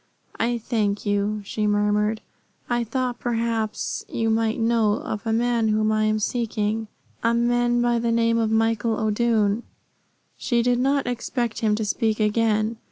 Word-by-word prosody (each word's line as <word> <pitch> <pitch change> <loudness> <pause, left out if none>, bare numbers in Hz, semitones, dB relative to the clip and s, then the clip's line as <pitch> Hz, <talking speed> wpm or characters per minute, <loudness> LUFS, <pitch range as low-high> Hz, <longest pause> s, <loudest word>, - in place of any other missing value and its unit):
"I 235 +1 +1
thank 215 -3 -1
you," 205 +1 0
she 210 +1 -1
murmured. 210 +1 +1 0.5
"I 240 -1 0
thought 245 +1 -2
perhaps 230 -2 -2
you 225 -1 0
might 225 +1 0
know 225 -2 +2
of 215 +1 -5
a - - +1
man 235 0 +1
whom 215 0 +2
I 215 0 +2
am 215 0 +2
seeking 220 -1 -1 0.3
a 230 0 +2
man 240 0 +2
by 240 -1 +2
the 230 0 0
name 230 0 +2
of 225 -1 +1
Michael 225 0 +1
O'Doone." 220 -1 +1 0.8
She 240 -2 0
did 245 0 +2
not 275 +2 +1
expect 240 -1 -2
him 215 -2 +2
to 220 0 -2
speak 220 +1 0
again. 215 +1 +1
225 Hz, 160 wpm, -23 LUFS, 215-235 Hz, 0.8 s, know